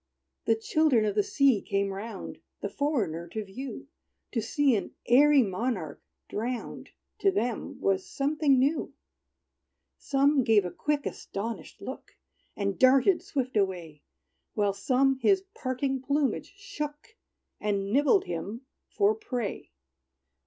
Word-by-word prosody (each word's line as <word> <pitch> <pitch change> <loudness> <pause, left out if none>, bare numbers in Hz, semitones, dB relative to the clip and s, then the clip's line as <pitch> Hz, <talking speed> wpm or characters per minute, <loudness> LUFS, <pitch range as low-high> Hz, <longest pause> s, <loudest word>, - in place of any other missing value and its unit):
The 225 - +4
children 245 0 +2
of 210 - 0
the 205 - +3
sea 265 0 +3
came 200 0 -1
round, 200 +1 -7 0.2
The - - -2
foreigner 205 - -1
to 215 +5 -4
view. 250 +7 -7 0.4
To 230 - 0
see 270 +3 +2
an 200 - -4
airy 280 +2 +6
monarch 190 - -3 0.3
drowned, 235 +3 -4 0.3
To 395 - +4
them 245 - -2
was 195 -1 +1
something 285 0 +1
new 280 +1 +1 1.0
Some 275 0 +3
gave 215 -4 +4
a 180 - -3
quick, 295 - -1
astonished 225 +4 -6
look, - - -8 0.4
And 200 -1 -2
darted 265 +8 +5
swift 260 -4 -3
away; 175 -7 -1 0.5
While 205 -2 +2
some 265 +5 +2
his 385 +5 +3
parting 265 - -2
plumage 285 +7 -1
shook, 395 -1 -7 0.4
And 200 -1 -1
nibbled 295 - +4
him 195 +8 -5 0.3
for 410 +1 +3
prey. 250 - -4
255 Hz, 125 wpm, -28 LUFS, 205-290 Hz, 1.0 s, airy